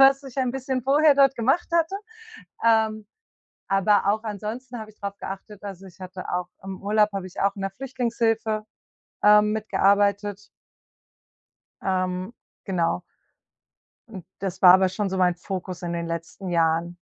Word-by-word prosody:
was 270 +1 +6
ich 270 -2 -11
ein 255 -2 +1
bisschen 265 -1 -2
vorher 290 +3 +5
dort 275 -1 +5
gemacht 265 +9 +1
hatte. 335 +2 +2 0.7
Ähm, 220 -2 +2 0.6
aber 195 +1 +3
auch 215 +2 +1
ansonsten 225 +4 -5
habe 215 -1 -8
ich 210 - -24
drauf 200 0 -5
geachtet, 195 +1 -8
also 195 -1 -8
ich 185 -1 -16
hatte 185 0 -8
auch 180 0 -1 0.2
im 190 -1 -7
Urlaub 210 +1 +3
habe 195 -2 -4
ich 185 - -13
auch 200 0 +2
in 200 - -9
der 195 - -1
Flüchtlingshilfe, 230 -2 -1 0.6
ähm, 210 0 +6
mitgearbeitet. 205 -1 +2 1.5
Ähm, 185 +2 -1 0.3
genau. 180 -3 0 1.1
Und 190 -6 -9
das 190 -1 -4
war 180 -1 +10
aber 190 0 +5
schon 195 +1 -2
so 190 - -3
mein 180 -1 +3
Fokus 185 0 -6
in 170 -1 -3
den 170 0 -3
letzten 170 +3 -5
Jahren. 165 0 +1
200 Hz, 155 wpm, -24 LUFS, 185-230 Hz, 1.5 s, war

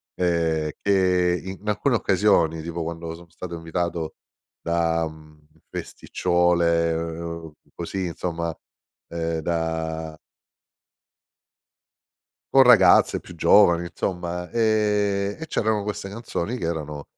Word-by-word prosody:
ehm, 80 -3 0
che 90 -3 +2
in 95 +2 -8
alcune 120 +5 +1
occasioni, 95 -6 +2
tipo 85 0 -4
quando 85 0 -5
sono 85 0 -15
stato 85 +1 -8
invitato 85 0 -3 0.5
da 85 -1 +1 0.6
festicciole, 85 -2 +1
ehm, 85 0 -5 0.2
così 95 +2 -3
insomma, 85 -1 -3 0.5
ehm 85 -1 -2
da 80 -1 -3 2.4
Con 135 -1 +8
ragazze 125 -4 +6
più 90 - -13
giovani 85 -1 +5
insomma 90 0 -4
e 105 -3 +1
e 160 - -6
c'erano 110 -8 0
queste 105 -1 -4
canzoni 115 +1 -4
che 90 - -5
erano 75 -3 -4
85 Hz, 100 wpm, -24 LUFS, 80-100 Hz, 2.4 s, Con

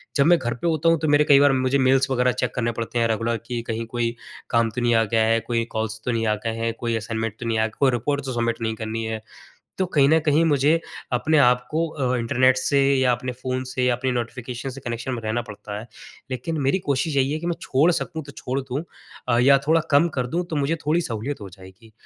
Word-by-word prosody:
जब 140 - +4
मैं 175 +1 +6
घर 120 -1 -2
पे 170 - 0
होता 165 0 +2
हूँ 165 -2 +3
तो 155 - -1
मेरे 145 +1 +5
कई 140 - +8
बार 145 0 +5
मुझे 130 +1 +1
मेल्स 135 +1 +3
वगैरह 125 0 +2
चेक 125 - -3
करने 120 -1 0
पड़ते 115 +1 -2
हैं 115 - +3
रेगुलर 115 +1 0
कि 120 -1 -3
कहीं 115 0 -3
कोई 120 0 -2 0.3
काम 115 -1 +2
तो 125 - -4
नहीं 120 -1 +3
आ 115 - +4
गया 110 +1 +1
है, 115 +1 +3
कोई 115 0 -1
कॉल्स 110 0 -3
तो 125 - 0
नहीं 115 -1 0
आ 105 - +2
गए 115 0 -1
हैं, 115 0 -1
कोई 115 -1 -1
असाइनमेंट 110 0 -4
तो 120 - -6
नहीं 115 -1 0
आया, 110 - +2
कोई 140 -2 +4
रिपोर्ट 140 +4 -1
तो 130 - -3
सबमिट 115 -1 -1
नहीं 110 0 -1
करनी 110 +1 -4
है। 110 -1 -4 0.6
तो 190 - +1
कहीं 140 -3 +5
न 160 0 +5
कहीं 155 +2 +4
मुझे 150 +2 +3 0.3
अपने 155 +6 +2
आपको 125 +5 +2
अ, 130 -5 -1
इंटरनेट 130 +2 +3
से 140 +2 +1 0.2
या 130 -1 +3
अपने 125 +1 -2
फ़ोन 130 0 -2
से 130 - -1
या 125 -1 +3
अपने 130 +1 -2
नोटिफिकेशन 125 +2 -4
से 135 +1 -9
कनेक्शन 120 +2 -4
में 115 - -4
रहना 110 +2 -1
पड़ता 105 -2 -8
है। 115 - -10 0.4
लेकिन 160 +5 -3
मेरी 135 +8 +1
कोशिश 145 +2 0
यही 135 +1 +2
है 155 - -2
कि 170 - -4
मैं 170 - 0
छोड़ 150 +7 +3
सकूँ 160 0 -3
तो 140 - -11
छोड़ 135 0 -3
दूँ 135 +4 -4 0.4
अ, 120 -1 +2
या 140 +3 +6
थोड़ा 165 0 +4
कम 145 +4 +5
कर 125 - 0
दूँ 175 +7 -1
तो 155 - -1
मुझे 145 +3 +1
थोड़ी 160 +3 +2
सहूलियत 120 0 -4
हो 100 - -7
जाएगी, 95 +4 -16
125 Hz, 255 wpm, -23 LUFS, 115-140 Hz, 0.6 s, कई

